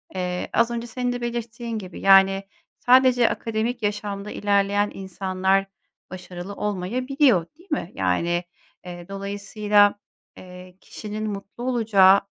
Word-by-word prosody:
eee, 180 -1 -3
az 235 0 +3
önce 235 0 -4
senin 245 +1 -2
de 245 - -5
belirttiğin 235 -1 -4
gibi, 185 -4 -9
yani, 195 0 +5 0.4
sadece 250 -1 +5
akademik 225 +1 -3
yaşamda 205 0 -3
ilerleyen 205 0 +1
insanlar 190 0 -1 0.5
başarılı 185 +1 -8
olmayabiliyor, 220 - +1
değil 350 +1 -21
mi? 290 - -2
Yani, 170 - 0 0.4
eee, 175 -1 -9
dolayısıyla, 205 +1 +1 0.4
eee, 180 0 -12
kişinin 215 0 -6
mutlu 200 +3 -7
olacağı 210 -6 +4
205 Hz, 115 wpm, -23 LUFS, 190-235 Hz, 0.5 s, yani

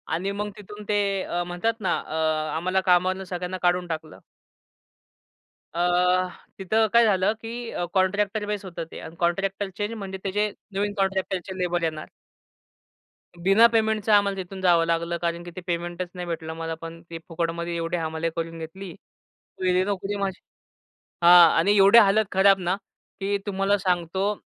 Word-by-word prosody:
आणि 195 +4 -2
मग 205 +1 -3
तिथून 210 +1 -10
ते 205 - +2 0.3
अ, 175 0 -2
म्हणतात 175 +6 -1
ना 185 - +1
अ, 155 - -7 0.4
आम्हाला 185 +3 0
कामावरून 185 +1 +2
सगळ्यांना 180 +1 -4
काढून 180 0 +2
टाकलं. 160 -1 -6 1.5
अ, 170 - -4 0.8
तिथं 220 +4 +2
काय 235 0 +6
झालं 195 0 +2
की 230 +1 -6
अ, 175 - -2
कॉन्ट्रॅक्टर 200 +2 +1
बेस 205 -1 -4
होतं 170 -2 -6
ते - - -8
अन् 160 +1 -10
कॉन्ट्रॅक्टरचे 195 +3 -1
आणि 215 +2 -3
म्हणजे 195 -3 -6
त्याचे 205 +2 0 0.2
नवीन 205 +1 -1
कॉन्ट्रॅक्टरचे 190 -1 -2
लेबर 175 -1 -1
येणार. 155 -1 -3 1.3
बिना 195 +6 +5
पेमेंटचं 220 -1 +1
आम्हाला 200 -1 +4
तिथून 190 +1 -9
जावं 170 -2 +4
लागलं 170 +1 -1
कारण 170 0 -3
की 175 - -9
ते 185 - -6
पेमेंटच 175 +1 -3
नाही 180 -1 -5
भेटलं 160 -1 -4
मला 165 0 -4
पण. 165 +1 -9
ते 165 - -6
फुकटमध्ये 170 0 -3
एवढी 165 +1 -2
हमाली 160 0 -2
करून 165 0 -4
घेतली. 175 +3 -8 0.7
गेली 185 0 +3
नोकरी 200 0 -2
माझी. 195 -1 -3 0.8
हां 175 -1 +9
आणि 205 +5 +3
एवढी 200 +4 +7
हालत 210 +1 +4
खराब 195 0 +5
ना, 180 +1 0 0.4
की 200 +1 0
तुम्हाला 200 0 +1
सांगतो 185 +1 0
185 Hz, 155 wpm, -25 LUFS, 170-200 Hz, 1.5 s, हां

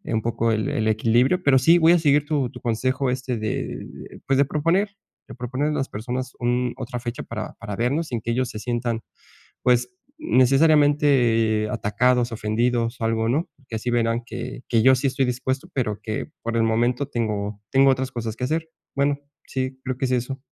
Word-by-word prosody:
un 110 - +1
poco 115 0 0
el 110 0 -1
el 110 0 -1
equilibrio. 120 +10 +2
Pero 135 -4 +5
sí, 165 +6 +6
voy 165 0 +6
a 175 - +4
seguir 145 -1 +3
tu 145 -5 0
tu - - -11
consejo, 130 +3 0
este, 125 -1 -2
de 110 -1 -2
de, - - -11
pues, 135 0 +3
de 140 - +4
proponer 165 +8 +1 0.4
de - - -10
proponer 130 +4 -2
a - - -1
las 135 -2 -1
personas 125 +4 -4
un 120 0 0
otra 125 -1 -5
fecha 120 0 -5
para 110 -1 -6
para 105 -3 -5
vernos, 140 +8 0
sin 115 -3 -3
que 115 - -2
ellos 125 +1 0
se 110 - -6
sientan, 120 -1 -2 0.6
pues 125 +6 +2 0.2
necesariamente 135 - +3
atacados, 120 +4 +1
ofendidos 115 +2 0
o - - -1
algo, 115 0 +1
¿no? 145 +8 0
Porque 130 -5 -8
así 115 +3 -2
verán 115 0 +1
que 125 +2 -6
que 115 -2 +3
yo 130 +2 +7
sí 135 - -1
estoy 130 0 0
dispuesto, 130 +2 -2
pero 110 -6 -1
que 110 -1 -3 0.2
por 115 0 -2
el 115 - +3
momento 120 +4 +1
tengo 105 -4 -2
tengo 135 0 +5
otras 130 0 -1
cosas 115 -2 -4
que 125 - -3
hacer. 160 +4 -1 0.3
Bueno, 140 0 +2 0.3
sí, 130 0 -3
creo 130 -1 -3
que - - -1
es 130 - -2
eso. 125 +2 -2
125 Hz, 200 wpm, -23 LUFS, 115-135 Hz, 0.6 s, yo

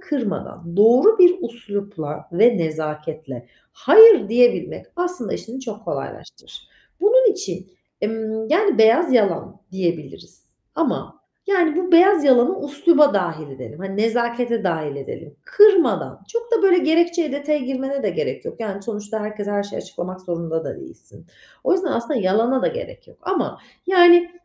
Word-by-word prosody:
kırmadan, 205 - -6
doğru 250 - +5
bir 360 -1 +6
üslupla 200 -9 -7
ve 225 +6 +3
nezaketle 155 -4 -6 0.3
hayır 440 - +7
diyebilmek 240 +1 +1
aslında 350 - -4
işini 245 +4 -8
çok 220 -4 -9
kolaylaştırır. - - -9 0.3
Bunun 455 +3 +4
için, 185 - -7 0.4
ımm, 220 0 -4
yani 385 - +1
beyaz 235 +8 +4
yalan 200 -3 0
diyebiliriz 170 -7 -6 0.3
ama, - - -3 0.3
yani, 355 -5 +1
bu 360 -1 -2
beyaz 355 -1 +5
yalanı 265 +6 +3
üsluba 295 -1 +3
dâhil 165 -6 -3
edelim, 135 +3 -11
hani, 195 +1 -7
nezakete 235 0 -1
dâhil 160 -5 -3
edelim. 140 - -10
Kırmadan, 415 -7 +3
çok 465 +1 -5
da, 450 -4 +2
böyle, 370 -2 +4
gerekçeye, 340 -2 +1
detaya 290 +1 -2
girmene 270 +1 -4
de - - -1
gerek - - -4
yok. - - -9
Yani, 200 -2 -6
sonuçta 210 0 -6
herkese 210 -1 -6
her 205 0 -1
şeyi 200 0 -8
açıklamak 185 +1 -8
zorunda 170 -2 -5
da - - -6
değilsin. 340 -2 -16 0.4
O - - +2
yüzden 365 -2 0
aslında 235 +4 -3
yalana 225 +8 0
da - - +1
gerek - - -9
yok. - - -21
Ama 380 -1 -3 0.3
yani 350 -1 +5
235 Hz, 145 wpm, -20 LUFS, -, 0.4 s, hayır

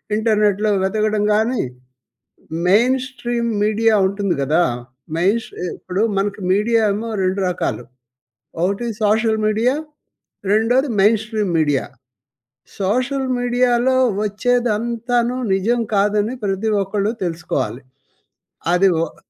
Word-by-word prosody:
ఇంటర్నెట్‌లో 210 -1 +2
వెతకడం 210 +1 0
కాని 225 +4 +1 1.1
మెయిన్ 240 +7 +4
స్ట్రీమ్ 240 -2 -3
మీడియా 220 +1 +2
ఉంటుంది 200 -2 -1
కదా! 155 +6 +2 0.5
మెయిన్ 195 +7 +2
స్ట్ర్ - - -11 0.2
ఇప్పుడు 185 +3 -2
మనకు 200 +1 -1
మీడియా 225 +4 +2
ఏమో 225 +3 -4
2 185 +1 0
రకాలు. 150 -8 -2 0.8
ఒకటి 200 +6 0 0.2
సోషల్ 220 +1 +2
మీడియా 225 +5 +2 0.8
రెండోది 245 +6 +2
మెయిన్ 215 +2 +4
స్ట్రీమ్ 215 -4 -2
మీడియా. 145 -4 +1 1.0
సోషల్ 255 +7 0
మీడియాలో 245 +1 +2 0.3
వచ్చేదంతాను 235 +2 0 0.2
నిజం 230 +6 +1
కాదని 210 +3 +1
ప్రతి 200 +2 -1
ఒక్కళ్ళు 205 +2 -1
తెలుసుకోవాలి. 160 -7 -3 0.9
అది 190 +2 +4 0.2
ఓహ్! - - -11
215 Hz, 105 wpm, -19 LUFS, 195-235 Hz, 1.1 s, మెయిన్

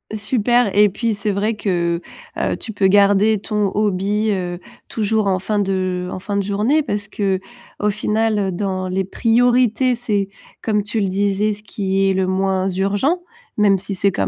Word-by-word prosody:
Super 240 +1 +2
et 210 0 +6
puis 225 +3 -1
c'est 205 +1 -2
vrai 210 +3 0
que, 175 -4 -1 0.4
heu, - - -1
tu 225 - -7
peux 200 -2 +2
garder 205 +2 +4
ton 210 -1 -1
hobby, 210 +1 0
heu, 180 -2 -3 0.3
toujours 220 -1 0
en 190 -1 +1
fin 210 +3 -2
de 185 -2 -1
en - - -5
fin 200 +1 -3
de 200 - +1
journée 215 +10 +1
parce 205 -5 -3
qu'au 205 +2 -3
final, 215 +1 0
heu, 195 -2 0
dans 185 0 -2
les 190 0 -1
priorités 245 +3 +2
c'est, 210 -5 -1 0.3
comme 210 -2 0
tu 210 +2 -2
le 200 - +1
disais, 200 +2 +1
ce 210 +1 -12
qui 195 -2 0
est - - +2
le 190 0 0
moins 190 0 0
urgent, 205 - 0 0.4
même 205 -2 +4
si 195 0 -4
c'est 200 +2 +2
quand 95 - -1
205 Hz, 180 wpm, -19 LUFS, 190-215 Hz, 0.4 s, et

